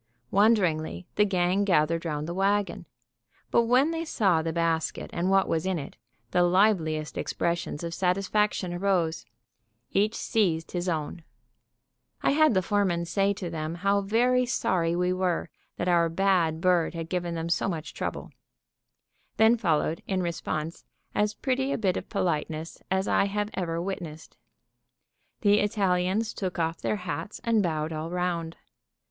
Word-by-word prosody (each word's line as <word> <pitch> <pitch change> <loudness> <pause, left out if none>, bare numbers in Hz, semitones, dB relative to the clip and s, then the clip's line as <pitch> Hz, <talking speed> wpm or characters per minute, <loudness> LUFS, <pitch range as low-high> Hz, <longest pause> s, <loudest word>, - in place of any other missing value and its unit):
Wonderingly, 185 -6 +2
the 210 - +3
gang 185 0 +1
gathered 165 -3 +2
round 150 -1 -2
the 170 - -3
wagon. 195 -1 0 0.6
But 235 - +4
when 255 +7 +3
they 330 0 -2
saw 195 - +2
the 165 0 -2
basket 165 -1 -1
and 175 +2 0
what 195 0 +3
was 160 - 0
in 190 -1 0
it, 140 - -7 0.4
the 180 - +3
liveliest 175 -4 +2
expressions 170 -2 -2
of 170 0 -4
satisfaction 195 +1 0
arose. 175 -3 0 0.6
Each 210 +3 +2
seized 170 -7 0
his 175 0 -2
own. 160 +1 -3 1.0
I - - +4
had 310 -4 +4
the 185 - +2
foreman 185 -4 +1
say 195 +3 +1
to 185 -4 -6
them 155 0 -3
how 200 +3 +1
very 245 +5 +2
sorry 175 -8 0
we 180 +1 +1
were 185 -2 -1 0.3
that 175 - -2
our 170 -2 +3
bad 170 -3 +1
bird 175 -2 +2
had 165 -1 -4
given 175 -1 -2
them 165 0 -3
so 170 +3 0
much 165 -3 -5
trouble. - - -5 1.1
Then 220 +2 +6
followed, 165 -6 0
in 190 -2 0
response, 165 -1 -3 0.3
as 210 0 +1
pretty 265 +1 -1
a - - 0
bit 190 -5 +1
of - - -5
politeness 160 -1 -2
as 190 +1 0
I - - +3
have 205 +1 -2
ever 170 -3 -2
witnessed. 170 -4 -6 1.1
The 205 -1 +4
Italians 200 +1 +1
took 185 -3 -4
off 165 0 -1
their - - 0
hats 180 0 -5
and 230 -3 +3
bowed 160 -3 -1
all 155 +1 -4
round. 170 -2 -2
180 Hz, 155 wpm, -27 LUFS, 165-200 Hz, 1.1 s, Then